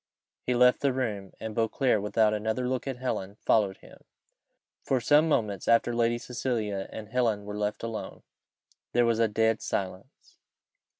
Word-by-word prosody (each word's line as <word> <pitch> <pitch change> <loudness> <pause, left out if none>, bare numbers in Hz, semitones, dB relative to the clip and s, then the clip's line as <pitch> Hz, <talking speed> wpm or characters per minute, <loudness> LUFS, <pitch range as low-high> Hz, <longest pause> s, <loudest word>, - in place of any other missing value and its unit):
He 125 - +2
left 125 +1 +5
the 140 - +2
room; 105 -7 -3
and 110 -1 -5
Beauclerc, 115 0 +1
without 105 +1 +2
another 110 +4 -1
look 130 +1 -2
at 135 -2 -3
Helen, 100 -6 -3
followed 105 -3 +1
him. - - -17 0.8
For 130 - +1
some 150 +6 +4
moments 105 - 0
after 115 +1 +3
Lady 120 0 +2
Cecilia 115 -5 -3
and 105 -1 -8
Helen 115 -4 0
were 105 - -6
left 105 +1 -2
alone, 115 -1 -6 0.7
there 120 0 +4
was 115 -1 +1
a 115 - +4
dead 110 +1 +1
silence. 95 -1 -5
115 Hz, 160 wpm, -28 LUFS, 105-125 Hz, 0.8 s, left